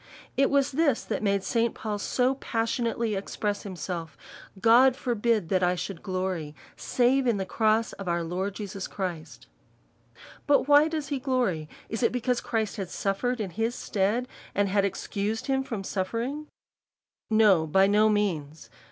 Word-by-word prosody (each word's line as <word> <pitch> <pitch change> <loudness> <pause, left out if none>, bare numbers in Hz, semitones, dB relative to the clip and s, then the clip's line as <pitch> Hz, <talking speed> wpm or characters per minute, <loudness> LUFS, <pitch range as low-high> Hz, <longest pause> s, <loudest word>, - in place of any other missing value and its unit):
It 275 - +3
was 280 0 +2
this 285 -3 +2
that - - -3
made 200 -2 +1
St. 230 +1 0
Paul 210 -2 -4
so 250 +5 +1
passionately 230 -2 -1
express 205 +1 -2
himself, 175 -4 -6 0.4
God 240 +4 +6
forbid 230 -7 0
that 185 -1 +2
I 180 0 +2
sJiould 180 0 -5
glory, 185 -5 -3 0.2
save 255 +1 +2
in 230 -4 +2
the 190 - -2
cross 220 +2 +1
of 195 - -8
our 170 -1 0
Lord 185 +4 -3
Jesus 195 -2 -5
Christ: 175 -5 -6 1.0
but 285 -2 +4
why 290 +1 +6
does 315 -3 -3
he 280 -2 -1
glory? 240 - -1 0.2
Is 225 - -4
it 235 - +3
be 250 - -1
cause 250 0 0
Christ 220 -3 -2
had 190 -3 -4
suffered 245 +6 -1
in 200 -4 -3
his 225 +5 -1
stead, 215 +4 0 0.3
and 200 0 +2
had 200 0 +2
excused 205 +4 -3
himself 265 -1 0
from 210 -5 -4
suffering? 235 +11 -3 0.8
No, 210 -7 +4
by 190 +5 +4
no 210 +2 +4
means. 160 -8 -2
215 Hz, 160 wpm, -27 LUFS, 190-245 Hz, 1.0 s, God